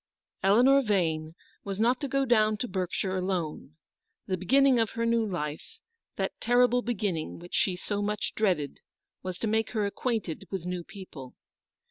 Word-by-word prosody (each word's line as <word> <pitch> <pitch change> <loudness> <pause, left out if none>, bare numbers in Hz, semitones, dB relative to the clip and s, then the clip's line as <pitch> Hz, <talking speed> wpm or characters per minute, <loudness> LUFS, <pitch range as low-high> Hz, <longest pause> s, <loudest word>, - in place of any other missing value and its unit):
Eleanor 245 +8 +5
Vane 165 -8 0 0.3
was 200 0 -4
not 245 +5 +2
to 285 - -1
go 275 0 +1
down 215 -3 +3
to 245 - -2
Berkshire 185 0 -2
alone. 180 -5 -3 0.5
The 185 - -1
beginning 260 +7 +4
of 225 -1 +2
her 230 - +1
new 230 0 +2
life, 155 -7 -4 0.4
that - - -1
terrible 245 +1 +4
beginning 205 -9 -2
which 175 +1 -12
she 185 - +2
so 205 +3 -3
much 210 0 -2
dreaded, 180 -10 0 0.4
was 185 -1 -5
to 225 - -2
make 220 +2 0
her 215 -3 +1
acquainted 200 -4 -2
with 190 -3 -4
new 180 -1 -3
people. 160 -10 -10
200 Hz, 160 wpm, -28 LUFS, 180-230 Hz, 0.5 s, Eleanor